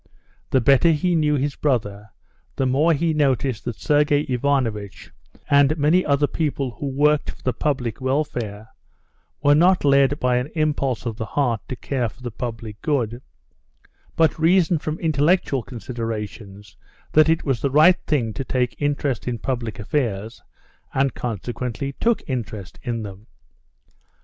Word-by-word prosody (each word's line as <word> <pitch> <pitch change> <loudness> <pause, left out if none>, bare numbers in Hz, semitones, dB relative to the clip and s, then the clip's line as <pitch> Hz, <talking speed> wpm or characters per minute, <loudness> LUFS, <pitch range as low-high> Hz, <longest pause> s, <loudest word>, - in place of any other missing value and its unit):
The 130 - +3
better 140 +7 +5
he 165 +3 +1
knew 150 -3 +2
his 140 +1 -1
brother, 105 -7 -1 0.5
the 135 - 0
more 140 +6 +3
he 165 +1 +1
noticed 135 -5 0
that 120 - -3
Sergey 145 -1 +2
Ivanovitch, 125 -7 -2 0.4
and 140 +2 +4
many 155 +5 +3
other 145 0 +2
people 140 -4 -2
who 130 +5 -6
worked 145 +2 +2
for - - -10
the 130 - 0
public 130 -4 -2
welfare, 120 -6 -2 0.7
were 145 0 +6
not 175 +2 +4
led 140 +1 +4
by 125 -1 +2
an 125 +3 -2
impulse 145 -6 0
of 115 -2 -3
the 110 -2 -4
heart 120 -5 0
to 130 - -4
care 125 -2 -2
for 125 +5 -18
the 120 - -4
public 115 -2 -6
good, 125 -5 -1 0.9
but 160 -1 +2
reasoned 170 -1 +3
from 155 +1 -4
intellectual 155 -2 +2
considerations 110 -4 -7 0.4
that 155 +1 +5
it 165 0 +2
was 135 -5 -1
a 140 - +2
right 160 +7 +5
thing 120 -8 0
to 135 - -4
take 125 0 -2
interest 145 -4 -1
in 120 -1 -1
public 115 -2 -3
affairs, 110 -3 -2 0.5
and 135 -1 +2
consequently 120 +3 -4
took 235 -1 +1
interest 110 - -5
in 115 -2 -3
them. 100 +1 -10
135 Hz, 150 wpm, -22 LUFS, 115-150 Hz, 0.9 s, were